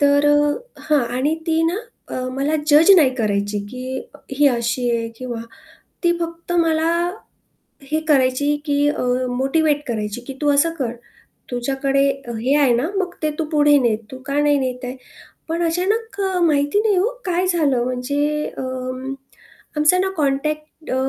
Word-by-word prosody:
तर 285 0 +4
अ, 290 0 +4 0.3
हां 295 -4 +2
आणि 290 +5 +1
ती 325 0 +2
ना - - -2 0.3
अ, - - -6 0.2
मला 280 +4 0
जज 305 +5 +6
नाही 285 -6 +5
करायची, 205 -3 -1
की 255 +1 -5 0.3
ही 290 +1 +4
अशी 240 0 -1
आहे 230 -1 -1
किंवा 240 -2 -5 0.6
ती 345 - +5
फक्त 335 +1 -5
मला 325 -1 +2 1.0
हे 310 - +2
करायची 280 +1 +3
की 290 -1 +1
अ, 295 - -1 0.3
मोटिव्हेट 295 +3 +1
करायची, 215 0 -3
की 270 - -6
"तू 295 - +2
असं 285 +4 +3
कर, 240 -4 -1 0.6
तुझ्याकडे 270 +2 +1 0.2
अ, 235 - -3
हे 265 +6 +2
आहे 250 -3 +4
ना, 255 +8 0
मग 365 -2 -2
ते 310 - +1
तू 320 - 0
पुढे 295 -1 +5
ने. 235 -5 +2
तू 260 - -8
का 280 +1 -1
नाही 290 -1 +3
नेता 255 -1 -3
आहे?" 255 +1 -5 0.5
पण 335 +1 -1
अचानक 400 +5 -1 0.3
माहिती 290 +5 +2
नाही 420 -3 +2
हो 380 +5 +3 0.2
काय 360 0 0
झालं? 290 -9 +2
म्हणजे 285 +4 -1
अं, 255 0 -4 0.6
आमचा 305 +5 +4
ना 380 - +1
अ, - - -4
कॉन्टॅक्ट 305 +1 0 0.2
अ, - - 0
285 Hz, 165 wpm, -20 LUFS, 255-315 Hz, 1.0 s, जज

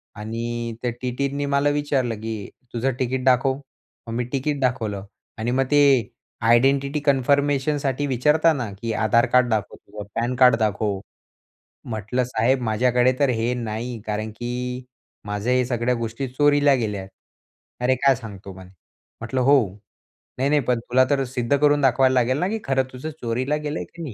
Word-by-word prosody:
आणि 115 +2 -4
त्या 125 - -1
टीटींनी 140 +3 -2
मला 140 +1 +2
विचारलं, 145 -5 0
की 110 -3 -5 0.2
तुझं 125 +3 0
तिकीट 130 0 -1
दाखव. 130 +1 +3 0.5
मग 115 - -5
मी 120 +1 -1
तिकीट 140 +2 -1
दाखवलं. 110 -6 -1 0.3
आणि 115 +2 -2
मग 135 +1 +1
ते 140 -7 +4 0.4
आयडेंटिटी 135 +4 +3
कन्फर्मेशनसाठी 140 0 +1
विचारताना, 140 -1 +2
की 115 -1 -2
आधार 115 +2 +3
कार्ड 125 -1 +5
दाखव, 110 -3 -1
तुझं 105 -1 -10
पॅन 120 +2 -1
कार्ड 125 -1 +6
दाखव. 105 -2 0 0.9
म्हटलं, 110 +3 -2
साहेब 125 +2 +1
माझ्याकडे 125 +3 +2
तर 140 - +4
हे 115 0 0
नाही 115 +2 -4
कारण, 110 +1 -3
की 125 +2 -5 0.4
माझ्या 105 +4 -1
हे 125 0 +3
सगळ्या 120 0 0
गोष्टी 115 +3 -4
चोरीला 145 +2 +3
गेल्या. 105 -6 -2 0.7
अरे, 125 +1 +3
काय 135 +1 +4
सांगतो 100 -5 -9
म्हणे. 95 0 -13 0.5
म्हटलं, 120 +3 -2
हो. 140 +3 +5 0.8
नाही, 135 +2 +1
नाही, 150 0 +3
पण 125 -1 0
तुला 125 +2 +2
तर 140 -1 +2
सिद्ध 125 +2 0
करून 145 0 +3
दाखवायला 130 0 +4
लागेल 130 +1 +2
ना, 180 - +1
की 220 +1 -2
खरं 135 -1 +1
तुझं 130 +5 -6
चोरीला 125 +5 -1
गेलंय 150 +2 -3
की 170 - -9
नाही? 140 -8 -6
125 Hz, 160 wpm, -23 LUFS, 115-140 Hz, 0.9 s, कार्ड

